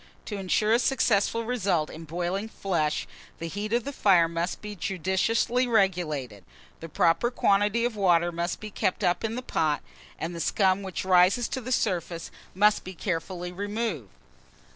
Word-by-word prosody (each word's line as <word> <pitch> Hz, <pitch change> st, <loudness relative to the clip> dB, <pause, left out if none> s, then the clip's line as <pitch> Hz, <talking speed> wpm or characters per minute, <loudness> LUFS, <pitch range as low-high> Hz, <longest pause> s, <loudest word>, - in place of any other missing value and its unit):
To 210 Hz, -, -5 dB
insure 205 Hz, +3 st, +1 dB
a 235 Hz, -, +4 dB
successful 230 Hz, -3 st, +1 dB
result 195 Hz, -10 st, 0 dB
in 165 Hz, +1 st, -9 dB
boiling 175 Hz, +6 st, -3 dB
flesh, 165 Hz, -8 st, -1 dB, 0.3 s
the 165 Hz, -, -5 dB
heat 205 Hz, +5 st, -4 dB
of 240 Hz, 0 st, +1 dB
the 280 Hz, -, -5 dB
fire 185 Hz, -9 st, +4 dB
must 170 Hz, +2 st, -3 dB
be 210 Hz, 0 st, -7 dB
judiciously 195 Hz, +8 st, 0 dB
regulated, 165 Hz, -, 0 dB, 0.4 s
the 165 Hz, -, -8 dB
proper 165 Hz, +10 st, +2 dB
quantity 205 Hz, 0 st, +2 dB
of 240 Hz, -2 st, -2 dB
water 175 Hz, -4 st, +3 dB
must 170 Hz, +1 st, -3 dB
be 215 Hz, -1 st, -8 dB
kept 185 Hz, -, -1 dB
up 175 Hz, +4 st, +1 dB
in 225 Hz, 0 st, -2 dB
the 250 Hz, -, -4 dB
pot, 155 Hz, -10 st, 0 dB, 0.3 s
and 165 Hz, +2 st, -4 dB
the 170 Hz, -, -6 dB
scum 190 Hz, +2 st, +2 dB
which 190 Hz, -1 st, -5 dB
rises 185 Hz, +5 st, +4 dB
to 260 Hz, -, -3 dB
the 255 Hz, +2 st, -6 dB
surface 175 Hz, -7 st, -1 dB, 0.2 s
must 210 Hz, +2 st, +3 dB
be 185 Hz, 0 st, -8 dB
carefully 175 Hz, 0 st, -3 dB
removed. 205 Hz, -, -3 dB
190 Hz, 165 wpm, -27 LUFS, 170-215 Hz, 0.4 s, a